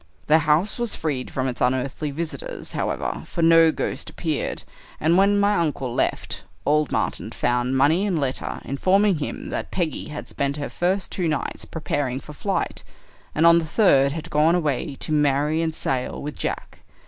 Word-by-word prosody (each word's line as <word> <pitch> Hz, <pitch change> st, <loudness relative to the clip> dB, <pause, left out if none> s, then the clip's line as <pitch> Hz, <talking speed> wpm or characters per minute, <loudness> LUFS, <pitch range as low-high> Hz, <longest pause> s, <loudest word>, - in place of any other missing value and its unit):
The 155 Hz, +2 st, +5 dB
house 160 Hz, +9 st, +1 dB
was 240 Hz, -3 st, 0 dB
freed 140 Hz, -5 st, -2 dB
from 130 Hz, 0 st, -2 dB
its 125 Hz, -, -4 dB
unearthly 130 Hz, +4 st, 0 dB
visitors, 170 Hz, -, -5 dB
however, -, -, -2 dB
for 170 Hz, -, -2 dB
no 165 Hz, 0 st, +7 dB
ghost -, -, -3 dB
appeared; 155 Hz, -4 st, -3 dB, 0.4 s
and 160 Hz, +3 st, +3 dB
when 200 Hz, +2 st, +4 dB
my 200 Hz, +1 st, +3 dB
uncle 145 Hz, -7 st, -1 dB
left, -, -, -1 dB, 0.2 s
old 150 Hz, 0 st, +2 dB
Martin -, -, -1 dB
found 125 Hz, +2 st, 0 dB
money 160 Hz, +9 st, +3 dB
and 185 Hz, -4 st, 0 dB
letter 135 Hz, -3 st, -2 dB
informing 190 Hz, +6 st, +2 dB
him 145 Hz, -, -4 dB
that -, -, -3 dB
Peggy 170 Hz, -5 st, -2 dB
had 150 Hz, -1 st, -7 dB
spent 140 Hz, +1 st, -2 dB
her 145 Hz, -, -4 dB
first 185 Hz, +3 st, -1 dB
two 180 Hz, -4 st, -1 dB
nights 150 Hz, -3 st, -2 dB
preparing 145 Hz, -5 st, -2 dB
for 150 Hz, -, -11 dB
flight, 195 Hz, +6 st, -2 dB, 0.5 s
and 155 Hz, -, +3 dB
on 170 Hz, 0 st, +7 dB
the -, -, -2 dB
third 140 Hz, -6 st, +4 dB
had 160 Hz, +1 st, -6 dB
gone 155 Hz, +3 st, +4 dB
away 150 Hz, -3 st, -1 dB
to -, -, -4 dB
marry 150 Hz, +1 st, +2 dB
and 160 Hz, -1 st, -1 dB
sail 130 Hz, -4 st, -2 dB
with 150 Hz, +1 st, -5 dB
Jack. -, -, -4 dB
155 Hz, 175 wpm, -23 LUFS, 140-170 Hz, 0.5 s, no